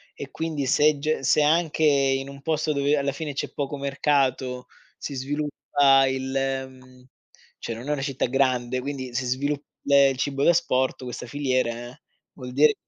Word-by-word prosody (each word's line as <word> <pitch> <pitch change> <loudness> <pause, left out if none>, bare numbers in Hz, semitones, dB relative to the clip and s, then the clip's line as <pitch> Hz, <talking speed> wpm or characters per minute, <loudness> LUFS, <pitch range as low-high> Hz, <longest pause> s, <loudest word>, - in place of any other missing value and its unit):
e 140 - -8
quindi 160 -4 -3
se 150 +3 +3
ge 150 0 -1
se 135 +4 +3
anche 160 0 +2
in 135 -2 +2
un 140 0 -11
posto 155 0 0
dove 140 +1 +1
alla 140 0 0
fine 145 +1 -5
c'è - - -4
poco 145 0 -3
mercato 135 -2 0 0.3
si - - -6
sviluppa 140 0 +2
il, 130 0 -3
ehm 130 -1 -4 0.5
cioè 115 - -4
non 120 +4 -9
è - - +1
una 140 - -3
città 135 -2 -1
grande, 130 -1 0
quindi 130 -2 -5
si 125 +1 -1
svilupp 140 +3 -1 0.2
ehm, 140 -1 +6
il 135 - -3
cibo 140 +1 -1
d'asporto, 130 -6 +2
questa 125 0 -6
filiera 125 -3 -2 0.4
vuol 125 -2 -9
dire 145 +2 +5
135 Hz, 170 wpm, -25 LUFS, 130-145 Hz, 0.5 s, ehm